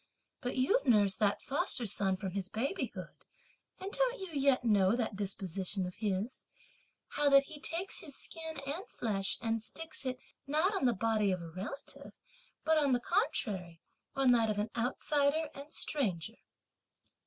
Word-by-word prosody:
But 250 0 -3
you've 285 - +3
nursed 205 -5 +5
that 205 -1 +2
foster 270 -2 0
son 195 -2 +2
from 190 -1 -4
his 195 0 -2
babyhood, 270 - -3 0.7
and 385 +2 -5
don't - - +1
you 380 -1 -6
yet 275 -3 +3
know 205 -3 +4
that 230 -4 -1
disposition 190 -1 -2
of 180 - -5
his, 210 +2 -2 0.6
how 295 -1 +2
that 275 0 +7
he 295 +1 -9
takes 340 +5 -1
his 285 -4 -6
skin 320 -2 -6
and 305 +8 -4
flesh 195 -4 -2
and 225 -1 0
sticks 315 +8 -8
it, 255 -1 -2 0.3
(not 315 +8 +3
on 385 -9 0
the 240 -2 +4
body 215 -1 +2
of 185 - 0
a 165 - -7
relative), 195 +10 -7 0.5
but, 320 -1 +4
on 280 -3 +3
the 245 - +3
contrary, 205 - 0 0.4
on 270 -2 +4
that 230 -2 +4
of 210 - 0
an 210 +2 -1
outsider 285 +5 +1
and 280 +2 -10
stranger? 220 - -1
245 Hz, 165 wpm, -33 LUFS, 200-295 Hz, 0.7 s, that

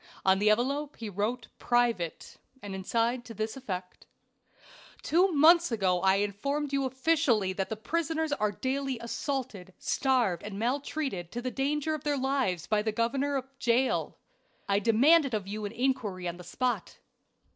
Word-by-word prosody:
On 190 0 +4
the 210 +1 +4
envelope 275 +7 0
he 225 -2 -5
wrote 220 +5 -2
"private," 235 -9 0 0.3
and 200 -1 -6
inside 230 +6 0
to 230 - -9
this 220 +2 -3
effect: 185 -8 -6 1.0
"Two 365 +4 +3
months 330 +1 +6
ago 185 -5 +1
I 190 0 +4
informed 275 +9 -1
you 275 -1 +1
officially 260 -7 +1
that 210 +3 -4
prisoners 320 -1 -1
are 210 -6 0
daily 265 +4 -2
assaulted, 235 -6 -4
starved, 245 -10 +1
and 205 -1 -7
maltreated 250 - -2
to 240 - -3
the 255 - -2
danger 295 +3 -1
of 310 - -4
their 290 -1 0
lives 260 -10 0
by 215 -1 +1
the 220 +1 -1
governor 270 +6 0
of 265 -2 -1
Jail. 245 +2 +1 0.5
I 200 0 +2
demanded 255 +6 +4
of 200 -3 -3
you 210 +1 -4
an 205 - -4
inquiry 225 -7 -1
on 175 0 -4
the 180 - -10
spot. 245 +8 -2
240 Hz, 155 wpm, -29 LUFS, 205-275 Hz, 1.0 s, months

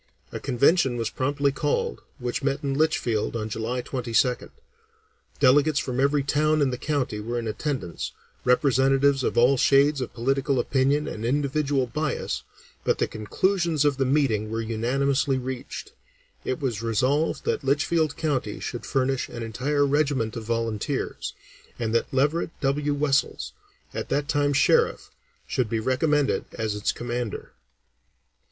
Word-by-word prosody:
A - - -5
convention 135 +1 +3
was 115 -2 -2
promptly 140 +1 0
called, 145 +2 -1 0.2
which 125 -1 -3
met 140 +1 -1
in 140 -1 0
Litchfield 135 -8 0
on 110 -1 -3
July 115 +3 -3
22nd; 125 0 0 0.9
delegates 145 +3 +4
from 125 -2 -1
every 140 +1 +2
town 155 +2 +2
in 140 -3 +2
the 125 - -3
county 140 -8 -1
were 120 +3 -3
in 115 -1 -3
attendance, 110 - -3 0.3
representatives 135 +1 +3
of - - -1
all 125 +3 +5
shades 140 +2 +4
of 125 - -4
political 135 +2 0
opinion 140 +4 +1
and 110 - -5
individual 140 +1 +1
bias, 150 +4 -2 0.4
but - - +1
the - - +2
conclusions 165 - 0
of 145 -2 +2
the 135 - +1
meeting 130 -6 +1
were 115 +1 -2
unanimously 130 +5 0
reached. 130 - -6 0.5
It 130 - -2
was 120 -7 -2
resolved 130 +7 0
that - - 0
Litchfield 145 +3 +1
County 135 -9 -1
should 120 - -5
furnish 135 -1 0
an 120 - -6
entire 140 +6 0
regiment 140 -6 +1
of 115 -2 -5
volunteers, 115 -2 -2 0.4
and 115 -2 -2
that 115 - +1
Leverett 145 +6 +1
W. 145 +1 +1
Wessells, 140 -1 0 0.4
at - - -4
that 145 0 0
time 145 -1 +1
Sheriff, 140 - +2 0.3
should 125 -4 -1
be 115 - 0
recommended 140 +4 +1
as 110 -1 -1
its 105 0 0
commander. 120 -2 -4
135 Hz, 145 wpm, -25 LUFS, 120-145 Hz, 0.9 s, all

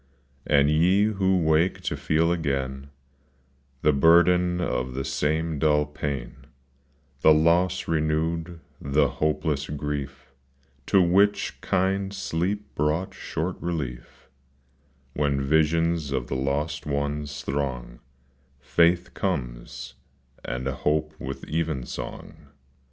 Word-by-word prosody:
And 70 0 +4
ye 90 +6 +4
who 95 -3 +2
wake 80 +1 +2
to - - -2
feel 80 +2 +1
again 70 -4 -2 0.9
The 75 - +4
burden 90 +4 +4
of 65 -7 -2
the 65 - -3
same 80 +1 -1
dull 75 -1 +3
pain, 70 -5 -5 0.8
The 80 - +6
loss 85 +4 +2
renewed, 80 +2 -1 0.2
the 70 +1 +2
hopeless 75 -1 -1
grief, 70 -3 -5 0.5
To 95 -2 +5
which 100 +4 +2
kind 95 +1 0
sleep 100 +1 -3
brought 75 +5 -1
short 85 +4 -4
relief 75 -11 -5 0.9
When 70 -2 0
visions 80 +2 +1
of 65 -3 -1
the 65 - -4
lost 75 +3 -2
ones 70 0 -3
throng, 65 -4 -3 0.3
— 65 +1 -37
Faith 85 +6 +2
comes, 60 -11 -4 0.5
and 65 +1 -4
hope 75 +3 0
with 65 +2 -6
even 80 -4 -2
song. - - -8
75 Hz, 110 wpm, -25 LUFS, 70-85 Hz, 0.9 s, The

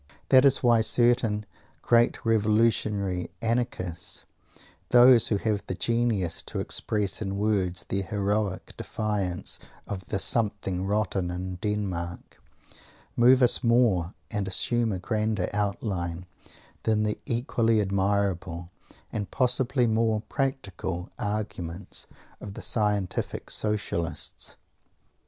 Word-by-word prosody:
That 130 0 +7
is 135 -1 +4
why 120 -2 +5
certain 115 -2 +3 0.4
great 120 +1 +3
revolutionary 105 -4 +1
Anarchists, 115 -7 -2 0.6
those 120 -1 +7
who 105 - +1
have 105 0 -1
the 95 - -2
genius 115 -6 0
to - - -4
express 105 -2 -2
in 100 -2 -3
words 95 -4 +1
their 100 - -1
heroic 100 -1 -2
defiance 100 -5 -2 0.3
of 95 -2 -6
"the 105 - -1
something 95 -2 -1
rotten 100 -3 0
in 90 +1 -4
Denmark," 90 -4 -4 0.7
move 125 +2 +6
us 125 - +4
more, 115 -7 +3 0.2
and 105 -3 -1
assume 115 +4 +1
a 95 - -2
grander 105 0 -1
outline, 95 -4 -2 0.6
than 110 -1 +1
the 105 0 -1
equally 115 -2 +1
admirable, 95 -3 -1 0.4
and 105 -2 -3
possibly 125 0 +2
more 110 -1 +1
practical, 100 - -3
arguments 100 -4 -4 0.3
of 100 -2 -8
the - - -6
Scientific 105 -4 -1
Socialists. 105 -6 -2
105 Hz, 110 wpm, -27 LUFS, 95-115 Hz, 0.7 s, That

